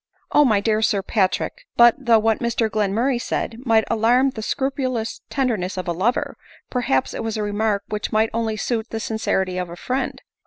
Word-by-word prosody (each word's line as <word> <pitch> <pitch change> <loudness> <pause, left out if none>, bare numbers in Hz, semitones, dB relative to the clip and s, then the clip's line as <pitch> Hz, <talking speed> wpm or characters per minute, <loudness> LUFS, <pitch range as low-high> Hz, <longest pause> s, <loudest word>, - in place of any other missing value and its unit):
"Oh! 295 - +6
my 220 -7 +3
dear 215 0 +1
Sir 205 -2 +1
Patrick! 215 - -1
But 235 -1 +8
though 235 -4 +4
what 220 0 +1
Mr 235 -2 0
Glenmurray 225 +5 0
said 225 - -3
might 225 -1 +4
alarm 240 +4 +3
the 220 - -7
scrupulous 255 -2 -2
tenderness 220 -9 -1
of 185 - -4
a - - +1
lover, 205 +9 -1 0.3
perhaps 235 - 0
it - - -4
was 225 -1 -3
a 215 - -1
remark 205 0 0
which 210 -1 -3
might 220 +1 +2
only 225 -1 -1
suit 225 +1 -2
the 225 - -4
sincerity 190 -5 -1
of 180 -1 -4
a 170 - -8
friend. 255 +7 -3
220 Hz, 190 wpm, -22 LUFS, 210-240 Hz, 0.3 s, But